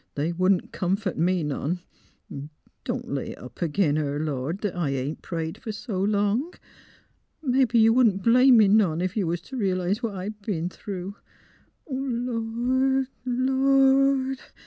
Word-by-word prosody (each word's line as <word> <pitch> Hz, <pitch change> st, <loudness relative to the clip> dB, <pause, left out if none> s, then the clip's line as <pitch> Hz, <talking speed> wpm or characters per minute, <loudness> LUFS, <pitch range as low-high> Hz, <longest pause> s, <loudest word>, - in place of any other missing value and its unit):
They 150 Hz, +4 st, -1 dB
wouldn't 185 Hz, +1 st, +1 dB
comfort 190 Hz, +1 st, -1 dB
me 175 Hz, +1 st, +1 dB
none.... 150 Hz, +4 st, -2 dB, 1.0 s
Don't 245 Hz, -1 st, -4 dB
lay 140 Hz, -, -3 dB
it -, -, -15 dB
up 125 Hz, -, -12 dB
ag 165 Hz, -2 st, -2 dB
'in 155 Hz, -7 st, +3 dB
her, 145 Hz, -1 st, -1 dB
Lord, 150 Hz, +4 st, -3 dB
that 205 Hz, -4 st, -2 dB
I 170 Hz, -5 st, -1 dB
ain't 135 Hz, +3 st, -3 dB
prayed 165 Hz, -2 st, -4 dB
fer -, -, -8 dB
s' 215 Hz, +3 st, -7 dB
long.... 205 Hz, -, 0 dB, 0.9 s
Mebbe 255 Hz, -3 st, +2 dB
you 225 Hz, 0 st, +6 dB
wouldn't 220 Hz, -6 st, +3 dB
blame 250 Hz, +2 st, +6 dB
me 215 Hz, -2 st, +6 dB
none, 190 Hz, -5 st, +3 dB
ef 185 Hz, -, -2 dB
you 200 Hz, -6 st, 0 dB
was 170 Hz, +1 st, -2 dB
t' 265 Hz, -, -10 dB
re 195 Hz, -7 st, 0 dB
'lise 185 Hz, +5 st, -1 dB
what 225 Hz, -5 st, -3 dB
I 190 Hz, +2 st, -4 dB
b 210 Hz, -3 st, -4 dB
'en 165 Hz, +2 st, -2 dB
through.... 195 Hz, 0 st, -7 dB, 0.7 s
Lord 255 Hz, 0 st, -1 dB
— -, -, -40 dB
Lord!" 270 Hz, +1 st, +3 dB
205 Hz, 165 wpm, -25 LUFS, 175-250 Hz, 1.0 s, you